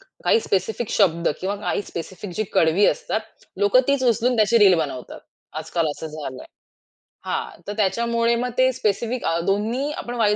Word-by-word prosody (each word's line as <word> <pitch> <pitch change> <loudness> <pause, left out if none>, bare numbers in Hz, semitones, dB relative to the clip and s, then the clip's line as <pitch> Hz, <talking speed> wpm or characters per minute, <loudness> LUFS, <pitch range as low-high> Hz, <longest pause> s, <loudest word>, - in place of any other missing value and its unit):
क - - -23 0.2
काही 460 - +4
स्पेसिफिक 210 - -1
शब्द, 170 -5 +2
किंवा 195 +2 -2
काही 205 - -2
स्पेसिफिक 185 +2 -7
जी 215 - +1
कडवी 165 +5 +3
असतात, - - 0 0.4
लोकं 415 +5 +5
तीच 280 -1 +2
उचलून 240 +1 +2
त्याची 220 +1 +4
रील 200 -4 +7
बनवतात. 140 -5 -5 0.4
आज-काल 165 -2 -1
असं 155 +2 -6
झालं 150 -4 -7
आहे. - - -14 0.8
हां, - - -4
तर 205 - -3
त्याच्यामुळे 235 +3 +1
मग 245 +1 -1
ते 255 0 +4
स्पेसिफिक 235 +3 -1
अ, 165 - +1
दोन्ही 225 +9 0
आपण 245 -5 -5
वाई 210 -3 +3
215 Hz, 175 wpm, -22 LUFS, 185-240 Hz, 0.8 s, रील